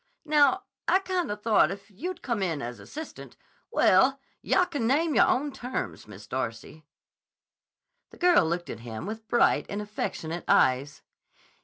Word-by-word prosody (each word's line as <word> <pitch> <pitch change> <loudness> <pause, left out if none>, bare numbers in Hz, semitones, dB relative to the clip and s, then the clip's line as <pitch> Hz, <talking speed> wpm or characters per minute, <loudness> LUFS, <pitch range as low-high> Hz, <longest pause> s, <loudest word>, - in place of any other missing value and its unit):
Now, 300 +4 +4 0.2
I - - +5
kinda 360 - -2
thought 210 -7 +3
if 200 +2 -8
you'd 345 - -6
come 235 -5 -1
in 165 -6 -1
as 120 -2 -6
assistant—well, 275 - 0 0.2
yah 365 - +3
can 285 -10 -2
name 305 +5 +2
yahr - - +5
own 285 +3 +1
terms, 255 0 -5
Miss - - -11
Darcy." 155 -1 -5 1.2
The - - -16
girl 355 - +5
looked 175 +1 -3
at 115 - -7
him 115 +3 -7
with 220 +2 -7
bright 240 - +3
and 200 - -3
affectionate 175 -5 -4
eyes. 135 +3 +2
220 Hz, 145 wpm, -27 LUFS, -, 1.2 s, I